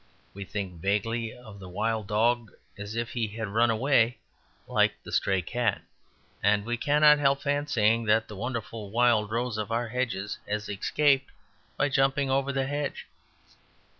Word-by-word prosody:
We 100 0 -7
think 95 -5 -5
vaguely 110 +4 -1
of 110 -4 -13
the 95 -2 -10
wild 110 +2 -2
dog 115 +1 +1 0.2
as 100 +2 -7
if 115 0 -2
he 115 -2 -1
had 110 0 -5
run 115 +3 +3
away, 120 +1 +2 0.5
like - - +2
the - - -9
stray 95 -2 +1
cat. 120 +2 -1 0.6
And 105 0 +2
we 120 +1 -1
cannot 150 +4 +5
help 140 -1 +2
fancying 125 -6 +1
that 110 +1 +2
the 105 - -9
wonderful 115 -1 -5
wild 115 -1 +3
rose 115 0 -2
of 105 +1 -4
our 115 0 -1
hedges 110 -5 -3
has 105 0 -2
escaped 135 +7 +1 0.5
by 145 - +2
jumping 135 0 +2
over 135 +1 +1
the 135 -1 0
hedge. 145 +1 -3
115 Hz, 160 wpm, -27 LUFS, 105-130 Hz, 0.6 s, cannot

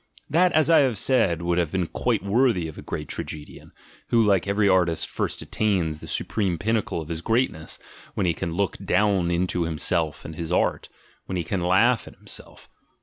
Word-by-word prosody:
That, 175 +4 +4
as 155 - +4
I 165 -1 +6
have 130 -6 +2
said, 95 -11 +2
would 85 0 +1
have 85 -3 0
been 95 -2 0
quite 110 +3 -1
worthy 105 -5 +2
of 80 - -9
a - - -9
great 75 - -5
tragedian; 75 -1 -7 0.4
who 115 - +2
like 100 -3 +2
every 100 +1 +2
artist 90 -4 +2
first - - -3
attains 90 -8 0
the - - -10
supreme 95 -6 -1
pinnacle 110 -3 -1
of 80 - -9
his 80 -1 -4
greatness 115 -6 -1 0.4
when - - 0
he 85 - +2
can 85 +1 -4
look 100 +2 -1
down 95 -2 +2
into 90 +1 0
himself 80 0 -1
and 80 - -7
his 85 +1 -5
art, - - 0 0.4
when 95 - -3
he 85 - -1
can 100 -2 -2
laugh 100 +7 +3
at - - -12
himself. - - -11
95 Hz, 195 wpm, -24 LUFS, 85-110 Hz, 0.4 s, I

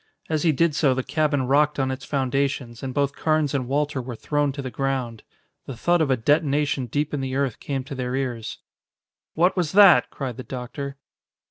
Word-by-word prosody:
As 155 -1 +1
he 170 - +3
did 155 +2 +2
so 140 -3 +2
the 130 - -1
cabin 150 -2 0
rocked 145 +3 +2
on 135 -1 0
its 130 +1 -6
foundations 135 -3 -1
and 135 - -4
both 140 +1 0
Carnes 155 -2 +1
and 130 -3 -1
Walter 145 0 0
were 125 -1 -6
thrown 145 +4 0
to 140 - -5
the 130 - -5
ground. 130 -5 -2 0.5
The 130 - -6
thud 175 +7 +2
of 155 - +1
a 130 - +3
detonation 145 0 +1
deep 145 +6 -2
in 145 - -1
the 130 0 -3
earth 135 -4 -1
came 135 -2 -3
to 140 +2 -8
their 125 -1 -3
ears. 125 -5 -3 0.8
"What 175 +4 +3
was 175 -5 -1
that?" 200 -2 +7
cried 130 -4 -5
the 130 - -6
doctor. 135 +3 -6
140 Hz, 205 wpm, -24 LUFS, 130-150 Hz, 0.8 s, that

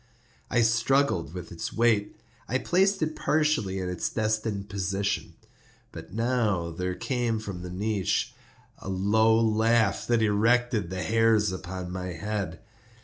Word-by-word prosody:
I 120 - +3
struggled 115 - +2
with 90 -2 -7
its 85 - -5
weight; 110 -3 +1 0.3
I 130 - +1
placed 190 +5 +2
it 155 0 -2
partially 150 -11 +1
in 95 -1 -3
its 90 -1 -2
destined 110 -2 -1
position. 100 0 -2 0.6
But - - -10
now 110 -6 0
there 90 +2 -3
came 120 -2 -1
from 105 -4 -6
out - - -8
the 90 - -7
niche 100 +1 -1 0.5
a - - -7
low 110 +4 +3
laugh 110 -2 +2
that 120 -2 +2
erected 110 -1 +2
the 95 -1 -3
hairs 110 -2 +3
upon 90 -1 -6
my 90 0 -4
head. 100 0 -4
105 Hz, 145 wpm, -27 LUFS, 95-115 Hz, 0.6 s, I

